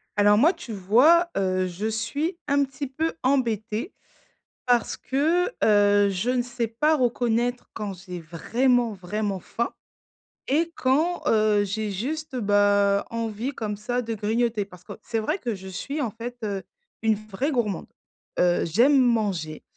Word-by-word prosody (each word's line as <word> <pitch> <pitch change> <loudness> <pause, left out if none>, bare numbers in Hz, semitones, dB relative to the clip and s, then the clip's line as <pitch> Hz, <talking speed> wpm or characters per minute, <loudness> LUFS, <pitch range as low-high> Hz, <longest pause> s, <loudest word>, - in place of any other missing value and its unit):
Alors, 205 0 +5
moi, 315 - +5
tu 225 - -8
vois, 255 - +4
heu, 185 -1 +1
je 180 +4 -5
suis 280 - -2
un 280 0 +3
petit 275 +1 -5
peu 315 +5 -2
embêtée 235 - 0 0.7
parce 245 -2 +1
que, 315 +7 +1 0.2
heu, 205 -1 +5
je 195 +5 -2
ne 250 -1 +1
sais 240 -1 -3
pas 300 +8 +2
reconnaître 245 -1 0
quand 210 -3 -4
j'ai 180 -1 -8
vraiment, 235 +9 +1
vraiment 200 +1 -3
faim 235 +6 -3 0.8
et 325 +5 +1
quand, 310 +7 +1
heu, 215 -2 +3
j'ai 210 +1 -3
juste, 275 +8 -4
bah, 205 -2 +3
envie 230 +2 -3
comme 215 -5 -4
ça, 245 +4 -2
de 225 -1 -3
grignoter. 220 +1 0
Parce 180 -3 -16
que - - -8
c'est 230 - -2
vrai 300 - -1
que 240 - -3
je 190 -1 -9
suis, 275 +11 -4
en 245 -6 -1
fait, 235 +3 -7
heu, 200 -2 -3 0.4
une 220 -1 +3
vraie 215 +6 -3
gourmande. 225 - -1 0.5
Heu, 175 0 +3
j'aime 240 - +4
manger, 205 - 0
225 Hz, 155 wpm, -25 LUFS, 205-255 Hz, 0.8 s, Alors